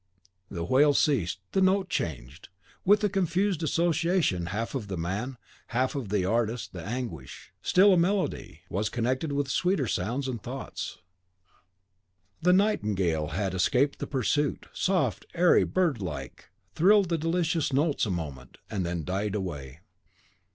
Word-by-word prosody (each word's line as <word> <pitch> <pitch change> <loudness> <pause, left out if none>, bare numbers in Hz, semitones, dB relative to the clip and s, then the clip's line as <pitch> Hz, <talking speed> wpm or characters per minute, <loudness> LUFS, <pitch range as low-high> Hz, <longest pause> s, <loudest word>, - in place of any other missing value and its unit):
The 85 -3 -4
wail 140 - +4
ceased, 95 - +1
the 190 - +1
note 190 0 +3
changed; 70 - -4 0.3
with 205 +3 +4
a - - +5
confused 190 -1 0
association 165 - +1
half 105 +5 -3
of 125 -7 -3
the 95 -2 -4
man, 100 +10 -3 0.3
half 130 +4 0
of 135 -8 -4
the 100 -3 +1
artist 115 +3 -1
the 85 -3 -7
anguish, 110 - -6
still 195 +2 +5
a - - +4
melody, 180 - -1
was 100 +4 -1
connected 130 +6 -1
with 140 0 0
sweeter 175 +1 +1
sounds 120 +7 -2
and 120 -4 -4
thoughts. 130 +2 -6 1.4
The 180 +2 +4
nightingale 105 - +1
had 95 +5 -2
escaped 125 +10 +2
the - - -4
pursuit, 140 +2 0
soft, 185 -1 0
airy, 175 +1 +5
bird 170 - 0
like, 70 -8 -6 0.2
thrilled 195 +1 +4
the 165 - +1
delicious 165 -1 0
notes 140 -2 +1
a - - -3
moment, 70 -8 -5
and 100 -4 -1
then 85 -1 -2
died 100 +4 -2
away. 75 -7 -5
125 Hz, 145 wpm, -28 LUFS, -, 1.4 s, a